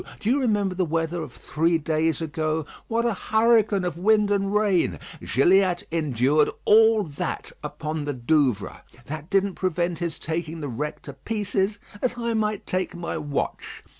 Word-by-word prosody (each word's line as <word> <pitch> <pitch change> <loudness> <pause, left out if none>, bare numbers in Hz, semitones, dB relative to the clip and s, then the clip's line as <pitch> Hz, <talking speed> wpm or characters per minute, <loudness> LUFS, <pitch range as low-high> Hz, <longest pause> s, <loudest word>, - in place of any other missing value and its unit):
Do 220 - 0
you 275 - +3
remember 205 -7 +1
the 185 0 0
weather 165 +1 -1
of 150 -5 -6
three 165 +7 0
days 160 0 0
ago? 155 0 -1 0.2
What 230 +1 0
a 235 - +2
hurricane 220 -1 +3
of 170 -2 -3
wind 210 +1 +3
and 195 -1 +1
rain! 200 - +2 0.3
Gilliatt 180 - +3
endured 150 -2 +2 0.2
all 220 0 +6
that 145 -6 -4
upon 155 -1 -4
the 145 - -2
Douvres. 125 -4 0 0.2
That 155 +2 -7
didn't 195 -1 +2
prevent 175 -2 -1
his 170 -2 -3
taking 165 0 -4
the 145 -2 -4
wreck 150 +6 -4
to 140 - -8
pieces, 200 +6 -1 0.2
as 245 -1 -1
I 235 -1 -1
might 215 -2 -1
take 185 0 -2
my 175 0 -4
watch. 145 -1 -4
175 Hz, 165 wpm, -25 LUFS, 155-205 Hz, 0.3 s, all